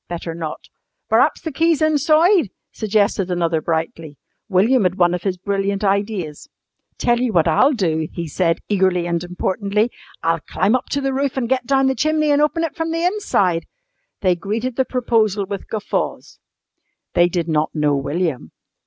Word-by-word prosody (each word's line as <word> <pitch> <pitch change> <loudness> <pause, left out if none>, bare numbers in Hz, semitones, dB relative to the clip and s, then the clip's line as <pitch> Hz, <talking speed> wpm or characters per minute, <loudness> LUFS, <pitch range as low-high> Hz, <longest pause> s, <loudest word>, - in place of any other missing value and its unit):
"Better 170 -1 -5
not." 165 -2 -6 0.4
"Per'aps - - +3
the 320 - -4
key's 325 +2 +2
insoide," 310 - +3 0.2
suggested 205 -3 0
another 170 -3 0
brightly. 160 -2 -3 0.3
William 215 +7 +3
had 185 -2 +1
one 175 -2 +3
of 180 - -2
his 185 -1 -2
brilliant 200 +1 -2
ideas. 200 -6 -2 0.5
"Tell 240 0 +2
you 250 -2 0
what 170 -5 +3
I'll 265 - +4
do," 160 - 0
he 170 -1 -5
said 165 +2 0
eagerly 185 -3 +1
and 170 0 -1
importantly. 200 +5 -1 0.3
"I'll 165 0 +1
climb 190 +7 0
up 255 0 -1
to 280 - -1
the 270 -1 -1
roof 275 0 -1
an' 255 - 0
get 255 0 -1
down 270 0 +3
the 265 - +2
chimney 310 +1 +1
an' 290 0 +3
open 305 +2 +1
it 330 - -3
from 325 0 -2
the 330 +1 -1
inside." 200 - 0 0.5
They 185 -3 +3
greeted 220 +7 -3
the 265 - +1
proposal 225 -5 +1
with 200 0 -6
guffaws. 215 -2 -3 0.7
They 175 0 +4
did 175 -2 -2
not 155 -1 0
know 150 -2 +2
William. 140 - -2
200 Hz, 170 wpm, -20 LUFS, 170-260 Hz, 0.7 s, I'll